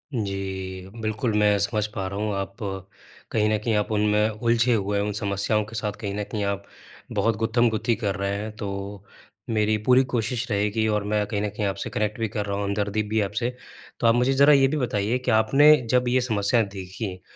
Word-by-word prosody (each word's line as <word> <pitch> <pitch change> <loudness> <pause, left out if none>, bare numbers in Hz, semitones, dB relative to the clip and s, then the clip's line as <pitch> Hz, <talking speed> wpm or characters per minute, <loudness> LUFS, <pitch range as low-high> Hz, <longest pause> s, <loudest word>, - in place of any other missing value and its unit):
जी। 95 -2 -4
बिल्कुल, 110 +1 -1
मैं 105 -1 +4
समझ 105 +1 0
पा 95 -2 -3
रहा 100 +1 -5
हूँ 105 -1 -1
आप 100 +1 -4 0.7
कहीं 105 -1 +2
न - - +2
कहीं 115 - 0
आप 105 +1 0
उनमें 105 +1 +2
उलझे 115 +2 +2
हुए 100 -1 0
उन 105 +1 -1
समस्याओं 100 +1 0
के 115 - -11
साथ 105 -1 -2
कहीं 100 -2 -3
न 105 - -2
कहीं 105 0 -4
आप 100 0 -2 0.5
बहुत 115 -2 +1
गुत्थमगुत्थी 115 0 +1
कर 100 -4 -2
रहे 100 0 -2
हैं 105 +1 -5
तो 105 -4 -4 0.8
मेरी 110 -1 +2
पूरी 130 +1 +6
कोशिश 120 +2 -1
रहेगी 105 +2 +1
और 105 -1 0
मैं 105 -1 +2
कहीं 105 -1 -2
न 105 - -1
कहीं 105 0 -3
आपसे 100 - -3
कनेक्ट 105 +1 -2
भी 110 - 0
कर 105 -2 -3
रहा 100 0 -2
हूँ 100 - -2
हमदर्दी 105 +1 -1
भी 110 +1 -3
है 105 - +2
आपसे। 115 +5 -2 0.5
तो 115 - +2
आप 115 - +5
मुझे 125 +2 +2
जरा 140 +2 +6
ये 135 -1 +5
भी 155 +3 -1
बताइए 115 -2 0
कि - - +4
आपने 135 +8 +6
जब 125 0 +2
ये 125 +1 +3
समस्याएँ 110 -1 +1
देखी, 95 0 -6
105 Hz, 210 wpm, -24 LUFS, 100-115 Hz, 0.8 s, पूरी